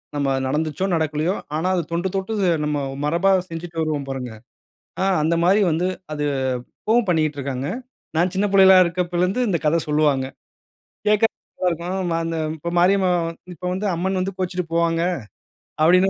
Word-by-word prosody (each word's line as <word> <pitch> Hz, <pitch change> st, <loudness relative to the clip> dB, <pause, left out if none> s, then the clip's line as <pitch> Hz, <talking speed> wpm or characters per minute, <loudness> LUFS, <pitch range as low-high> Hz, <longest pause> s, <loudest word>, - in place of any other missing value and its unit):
நம்ம 140 Hz, -1 st, 0 dB
நடந்துச்சோ, 155 Hz, +6 st, -1 dB
நடக்கலையோ! 160 Hz, +3 st, 0 dB, 0.2 s
ஆனா 165 Hz, +4 st, 0 dB
அது 175 Hz, -, 0 dB
தொண்டு 175 Hz, +2 st, 0 dB
தொட்டு 195 Hz, +3 st, -2 dB, 0.3 s
நம்ம 150 Hz, 0 st, 0 dB, 0.3 s
மரபா 170 Hz, +6 st, +2 dB, 0.2 s
செஞ்சுட்டு 165 Hz, 0 st, -6 dB
வருவோம் 150 Hz, -3 st, -1 dB
பாருங்க. 130 Hz, -3 st, -4 dB, 0.7 s
ஆ. 190 Hz, -, +2 dB, 0.2 s
அந்த 165 Hz, +2 st, +2 dB
மாரி 195 Hz, +4 st, +4 dB
வந்து 170 Hz, +4 st, +1 dB, 0.3 s
அது 150 Hz, -1 st, -2 dB, 0.6 s
இப்பவும் 225 Hz, 0 st, +2 dB
பண்ணிட்டிருக்காங்க. 145 Hz, -5 st, 0 dB, 0.5 s
நான் 175 Hz, +2 st, +2 dB
சின்ன 200 Hz, +2 st, +2 dB
புள்ளைகளா 190 Hz, -1 st, +8 dB
இருக்கப்போலிருந்து 180 Hz, +4 st, 0 dB
இந்த 175 Hz, -, +1 dB
கத 165 Hz, +2 st, +3 dB
சொல்லுவாங்க. 150 Hz, -3 st, +2 dB, 0.8 s
கேட்கறதுக்கு 210 Hz, +1 st, +3 dB, 0.3 s
நல்லாருக்கும். 180 Hz, +1 st, -1 dB
"அந்த 165 Hz, 0 st, -2 dB, 0.2 s
இப்ப 170 Hz, +3 st, -4 dB
மாரியம்மா 185 Hz, 0 st, +4 dB, 0.4 s
இப்போ 175 Hz, -, -9 dB
வந்து 200 Hz, +2 st, -2 dB
அம்மன் 190 Hz, +2 st, -1 dB
வந்து 190 Hz, 0 st, -3 dB
கோச்சுட்டு 180 Hz, -1 st, -2 dB
போவாங்க." 165 Hz, 0 st, +2 dB, 0.8 s
அப்படின்னு 180 Hz, +4 st, +5 dB
170 Hz, 140 wpm, -22 LUFS, 155-190 Hz, 0.8 s, புள்ளைகளா